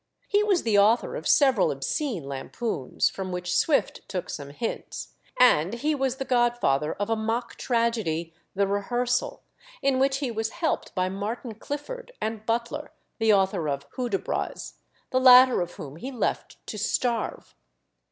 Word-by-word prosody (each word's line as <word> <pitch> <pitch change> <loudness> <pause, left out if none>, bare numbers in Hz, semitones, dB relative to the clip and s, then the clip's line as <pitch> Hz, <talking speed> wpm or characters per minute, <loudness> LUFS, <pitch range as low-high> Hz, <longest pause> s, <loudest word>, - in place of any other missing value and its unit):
He 410 +1 +3
was 395 -4 +2
the 215 -3 +3
author 225 - +3
of - - -4
several 265 -8 +4
obscene 185 - -2
lampoons, 135 - -2
from 190 -1 -4
which 180 0 -2
Swift 300 -4 +2
took 185 -2 -4
some 140 -2 -6
hints; 220 +11 -5 0.3
and 210 -6 +5
he 295 +6 0
was 265 -3 0
the 270 0 -4
godfather 240 - +2
of 205 +2 -3
a - - +3
mock 225 +2 -2
tragedy, 220 -9 -1 0.2
The 200 +1 +3
Rehearsal, 240 +5 -1 0.4
in 275 -1 +1
which 270 0 +2
he 275 -3 -2
was 220 0 -2
helped 330 -8 -1
by 185 -1 +1
Martin 215 +5 -4
Clifford 485 - -6
and 220 0 -4
Butler, 235 +6 -2 0.3
the 225 -1 +4
author 190 -5 +2
of 140 0 -3
Hudibras, 240 -7 -3 0.4
the 255 - +3
latter 255 -2 +8
of 175 0 -4
whom 145 +1 -9
he 255 - -6
left 245 - -3
to - - -6
starve. 235 -3 -1
230 Hz, 155 wpm, -26 LUFS, 190-255 Hz, 0.4 s, latter